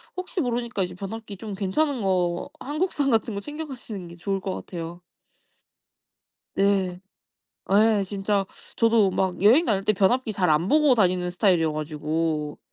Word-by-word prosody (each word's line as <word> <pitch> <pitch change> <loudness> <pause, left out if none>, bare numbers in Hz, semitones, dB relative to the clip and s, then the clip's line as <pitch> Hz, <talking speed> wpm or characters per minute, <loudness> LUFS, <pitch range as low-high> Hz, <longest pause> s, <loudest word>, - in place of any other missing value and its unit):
혹시 365 0 -3
모르니까 235 -5 -1
이제 180 - -4
변압기 200 +2 -7
좀 205 +1 -6
괜찮은 230 +7 0
거 180 +1 0
한국산 295 -1 -1
같은 225 -2 +1
거 200 - -3
챙겨 300 +7 -6
가시는 225 - -8
게 170 - -11
좋을 195 +3 -2
것 190 0 -4
같아요. 170 0 -7 1.5
네. 195 -2 +1 0.7
예. 215 0 +4
진짜 200 +1 -1 0.3
저도 225 -4 +4
막 185 0 -1
여행 245 +11 +6
다닐 200 - +1
때 215 - +3
변압기 215 +4 +2
잘 185 -4 +1
안 155 +4 +2
보고 300 -1 +5
다니는 180 -5 +2
스타일이어 175 -4 +2
가지고 155 0 -2
195 Hz, 300 characters per minute, -25 LUFS, 180-230 Hz, 1.5 s, 여행